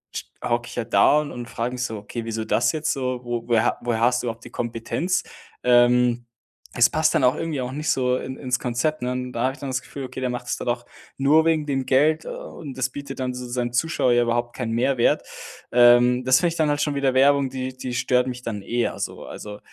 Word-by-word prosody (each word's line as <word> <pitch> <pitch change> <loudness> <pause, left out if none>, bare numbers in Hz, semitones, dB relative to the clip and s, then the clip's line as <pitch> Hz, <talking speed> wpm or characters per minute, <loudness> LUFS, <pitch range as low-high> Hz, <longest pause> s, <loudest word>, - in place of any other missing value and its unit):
sch - - -3 0.2
hocke 120 +1 -1
ich - - -9
ja 120 - -2
da 145 +5 +4
und 145 - -6
und 120 -1 -7
frage 120 +1 -3
mich 125 0 -3
so: 110 -2 -3
„Okay, 115 +3 -6
wieso 115 -1 -3
das - - +2
jetzt 155 0 -1
so? 130 -2 -3
Wo 120 -1 -4
woher 115 -2 +3
ha - - +1
woher 120 -2 -1
hast 125 +1 +2
du 120 - -3
überhaupt 115 +1 -5
die - - -9
Kompetenz?“ 120 +10 -2 0.4
Ähm, 120 0 +4 0.5
es 120 -1 +5
passt 155 0 +2
dann 130 - +3
auch 125 +3 +4
irgendwie 160 -4 -3
auch 125 +1 -4
nicht 150 +3 -3
so 125 -1 +2
in 130 +1 -5
ins 125 -3 -1
Konzept, 130 +5 -1
ne? 125 0 -1
Und 125 0 -4
da 115 - -3
habe 130 - +2
ich - - -15
dann 140 - -5
das 130 0 -1
Gefühl, 135 0 -7
okay, 130 +1 -7
der 130 - 0
macht 125 0 -5
es - - -1
dann - - -4
auch 120 0 -2 0.3
nur 150 +4 +4
wegen 160 -2 +1
dem 135 -2 -1
Geld 155 +5 +3
und 140 -5 -8
das 130 0 0
bietet 140 0 -8
dann 125 -1 -2
so 125 0 -6
z 120 - -7
seinem 120 -1 -2
Zuschauer 130 -2 +2
ja 120 0 +4
überhaupt 120 0 -1
keinen 120 -3 -3
Mehrwert. 120 +1 +1 0.5
Ähm, 120 +1 +6
das 130 +1 +5
finde 175 - +2
ich 165 - -5
dann 155 -2 +1
halt 145 0 0
schon 145 -1 0
wieder 140 -2 +1
Werbung, 140 0 +4
die 130 0 -5
die 130 -1 -5
stört 125 0 +1
mich 125 -1 -5
dann 110 -5 -4
eher 120 +4 -1
so. - - -5
Also 105 0 -8
125 Hz, 255 wpm, -23 LUFS, 120-135 Hz, 0.5 s, Ähm